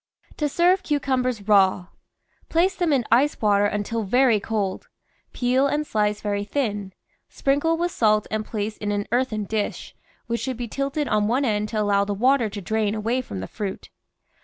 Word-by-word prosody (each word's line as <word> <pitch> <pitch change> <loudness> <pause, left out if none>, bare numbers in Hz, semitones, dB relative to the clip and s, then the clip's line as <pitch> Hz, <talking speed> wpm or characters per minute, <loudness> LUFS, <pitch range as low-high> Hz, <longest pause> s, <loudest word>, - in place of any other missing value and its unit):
TO 300 -1 -1
SERVE 355 +5 +3
CUCUMBERS 255 - -1
RAW 190 -3 +4 0.6
Place 355 +4 +2
them 350 -4 0
in 260 -5 +2
ice 270 +6 +3
water 205 -1 +3
until 210 +2 -2
very 235 +2 +3
cold. 200 -2 -3 0.4
Peel 255 +2 +2
and 295 +2 -1
slice 210 -4 0
very 205 -1 -1
thin; 205 -5 -2 0.4
sprinkle 290 +4 +1
with 350 +1 -1
salt 215 -5 +2
and 215 0 -1
place 215 0 -4
in 205 0 -3
an 205 0 -1
earthen 240 -3 0
dish, 210 +1 -3 0.3
which 235 -1 -2
should 260 -3 -3
be 240 -1 -4
tilted 275 +5 -2
on 210 -3 +1
one 255 +5 +1
end 210 -2 0
to 215 - -2
allow 200 -1 +2
the 200 0 -2
water 250 +1 +3
to 205 0 -7
drain 215 +1 -1
away 230 +4 -1
from 95 - -7
the 95 - -5
fruit. 195 -2 -6
220 Hz, 180 wpm, -23 LUFS, 205-270 Hz, 0.6 s, RAW